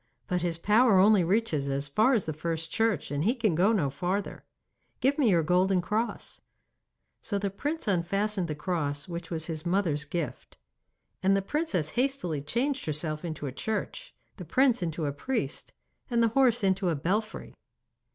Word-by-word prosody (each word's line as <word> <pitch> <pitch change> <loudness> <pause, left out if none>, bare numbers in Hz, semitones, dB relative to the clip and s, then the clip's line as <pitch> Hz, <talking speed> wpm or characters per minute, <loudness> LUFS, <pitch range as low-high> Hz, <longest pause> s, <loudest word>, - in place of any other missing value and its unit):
But 180 -1 -1
his 170 -1 -1
power 210 +4 +4
only 200 0 +6
reaches 170 -6 0
as 140 +1 -1
far 215 - +3
as 220 -6 +1
the 155 - -3
first 165 +1 -3
church, 225 -10 0
and 145 +1 -1
he 230 +7 +2
can 225 -7 +1
go 185 +7 +3
no 160 -11 +1
farther. 185 +7 -3 0.6
Give 270 +2 +2
me 255 -6 +4
your 170 -4 +3
golden 180 +3 +3
cross.' 215 +6 -2 0.8
So 200 - -2
the 200 -1 -2
prince 295 +10 -3
unfastened 195 +1 0
the 155 - -3
cross 150 -3 -2
which 170 -1 -6
was 160 -2 -3
his 160 -2 -4
mother's 170 -5 0
gift, 160 +1 -5 0.6
and 195 +1 +3
the 195 - -1
princess 195 - -1
hastily 240 - -1
changed 255 - -2
herself 155 +1 -2
into 155 -3 -5
a 135 - -3
church, 220 - -4 0.2
the - - -7
prince 255 -4 +2
into 165 -2 -2
a 140 - -1
priest, 260 - -3 0.4
and 235 -2 +2
the 230 - +4
horse 240 -2 +3
into 190 -1 +2
a 165 - +1
belfry. 205 +9 -2
185 Hz, 175 wpm, -28 LUFS, 160-220 Hz, 0.8 s, only